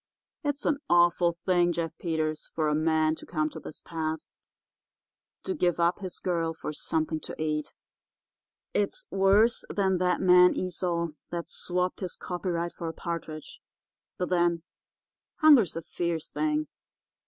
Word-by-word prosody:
It's 290 -1 -2
an 295 -2 +2
awful 175 0 +4
thing, 175 -2 +3
Jeff 165 -1 -3
Peters, 155 -2 -2
for 155 -1 +1
a 150 - +2
man 155 0 +2
to - - -10
come 155 -2 -1
to - - -8
this - - -9
pass—to 160 -1 -4 1.2
give 175 - +1
up 170 +1 +2
his 185 -3 -6
girl 165 -3 -1
for 155 - -5
something 160 +1 -1
to - - -8
eat—it's 155 - -5
worse 200 +4 +4
than 190 -2 +1
that 180 -1 +2
man 180 -1 +6
Esau, 175 -2 -1 0.2
that 170 -1 -4
swapped 180 0 -2
his 185 -3 -4
copyright 175 -1 -3
for 170 - -6
a 165 - -3
partridge— 165 - -6 0.6
but 180 - -2
then, 175 -2 +2 0.7
hunger's 285 - +6
a 165 - -4
fierce 170 -2 -3
thing. 150 0 0
170 Hz, 140 wpm, -28 LUFS, 160-180 Hz, 1.2 s, man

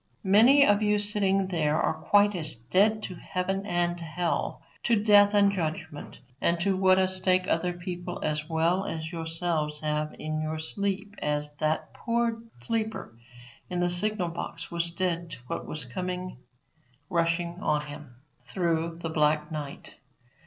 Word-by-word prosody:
Many 235 +9 +7
of 205 +1 +4
you 210 0 +3
sitting 195 -2 +1
there 155 -4 +1
are - - +1
quite 205 0 +3
as 155 -6 -2
dead 200 - +2
to 185 - -5
heaven 195 +3 -3
and 175 -2 0
hell, 170 +1 -2 0.2
to 235 - +4
death 205 -1 +5
and 200 -1 +5
judgment, 155 -7 -5 0.2
and 170 0 +2
to 195 +1 +2
what 185 0 +4
a 190 0 +3
stake 185 0 +2
other 180 +2 +1
people 175 0 -6
as 150 +1 -2
well 165 +4 +1
as 160 0 -4
yourselves 165 -2 -2
have 150 0 -2
in 155 0 -3
your 155 0 -3
sleep 200 +5 -3
as 150 0 0
that 155 0 -1
poor 230 -1 -1 0.2
sleeper 220 - -3 0.5
in 180 -1 -2
the 175 0 +3
signal 185 0 +1
box 165 0 -6
was 170 0 -1
dead 170 -1 -2
to - - -7
what - - -5
was 150 -4 -5
coming 180 +3 -5 0.7
rushing 170 +1 0
on 150 -6 +1
him 145 -4 -10 0.4
through 165 -2 0
the 165 - -2
black 150 0 +1
night. 150 -3 -7
175 Hz, 155 wpm, -27 LUFS, 155-195 Hz, 0.7 s, Many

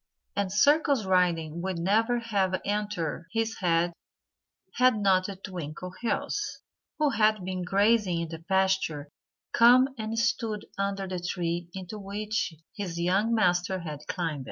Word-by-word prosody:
And 200 -2 -1
circus 280 0 +3
riding 170 -3 +1
would 185 -1 -2
never 220 +8 +2
have 200 -5 0
entered 205 -6 -2
his 225 0 -1
head 170 -1 +2 0.8
had 255 -3 +5
not 190 -2 +3
Twinkleheels, 185 - -4 0.6
who 300 -2 +2
had 215 -4 +2
been 185 -1 -3
grazing 200 -1 +2
in 165 - -4
the 165 0 -7
pasture, 190 -5 0 0.4
come 250 +3 +6
and 220 +1 -3
stood 230 -2 0
under 195 -1 -2
the 185 -1 -3
tree 175 -1 -2
into 190 +3 -6
which 205 -1 -2 0.2
his 180 -5 -4
young 195 +7 +2
master 180 -2 +1
had 155 -4 -6
climbed. 165 -5 -2
190 Hz, 130 wpm, -28 LUFS, 175-215 Hz, 0.8 s, come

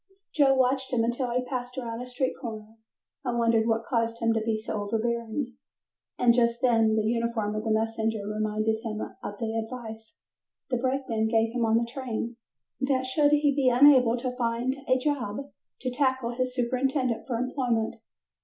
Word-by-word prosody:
Joe 275 -3 +4
watched 260 0 +1
him 235 -3 +2
until 240 +2 -1
he 250 +1 -1
passed 250 0 -5
around 235 -2 -4
a 250 - -6
street 255 +1 -1
corner 220 -2 -7 0.5
and 245 -3 -1
wondered 230 -1 +3
what 225 0 +1
caused 230 -1 0
him 230 0 +1
to 225 - 0
be 220 0 0
so 215 -1 -4
overbearing, 235 +4 -2 0.6
and 240 -1 +5
just 235 -1 +2
then 225 -3 +3
the 215 - +1
uniform 230 -1 0
of 215 0 -3
the 220 - -2
messenger 220 -1 0
reminded 215 +1 0
him 220 -2 -4 0.2
of 205 - -6
the 220 0 -3
advice 225 -1 -6 0.5
the 250 - +2
brakeman 255 -3 0
gave 225 0 +2
him 240 -2 +1
on 225 0 +3
the 235 - +1
train, 235 -2 -4 0.4
that 265 -1 +1
should 290 +3 +3
he 290 -1 +4
be 270 -3 +4
unable 250 -2 +6
to 250 +1 -3
find 240 +1 0
a 255 - +4
job 255 -6 -1 0.4
to 255 - -2
tackle 260 -2 0
his 255 +1 -2
superintendent 255 0 0
for 250 - -1
employment. 245 -2 -1
235 Hz, 175 wpm, -27 LUFS, 225-255 Hz, 0.6 s, unable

